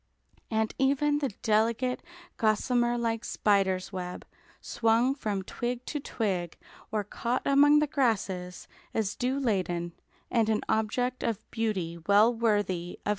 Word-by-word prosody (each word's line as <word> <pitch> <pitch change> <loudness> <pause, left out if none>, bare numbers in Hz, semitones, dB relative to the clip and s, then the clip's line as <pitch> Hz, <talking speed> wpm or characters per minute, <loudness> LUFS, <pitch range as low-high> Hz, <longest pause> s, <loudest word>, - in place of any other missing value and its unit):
And 220 -1 0
even 285 +2 +2
the 280 -3 -1
delicate, 230 +3 +1 0.4
gossamer 240 +2 +2
like 230 -1 -1
spider's 195 -2 +1
web 180 -1 -5 0.3
swung 230 +3 +2
from 210 -8 -3
twig 245 +5 -4
to 295 - -3
twig 190 - -2 0.3
or 210 -1 0
caught 235 +5 -2
among 290 +2 +6
the 300 - +4
grasses, 205 -11 -1 0.3
is 210 -3 0
dew 260 +3 -1
laden, 180 -8 -1 0.4
and 225 -2 +2
an 215 -1 +1
object 245 +4 0
of 230 -4 -2
beauty 190 -7 -2
well 210 +4 +6
worthy 205 -6 0
of - - -9
consideration. - - -7
225 Hz, 135 wpm, -28 LUFS, 200-250 Hz, 0.4 s, among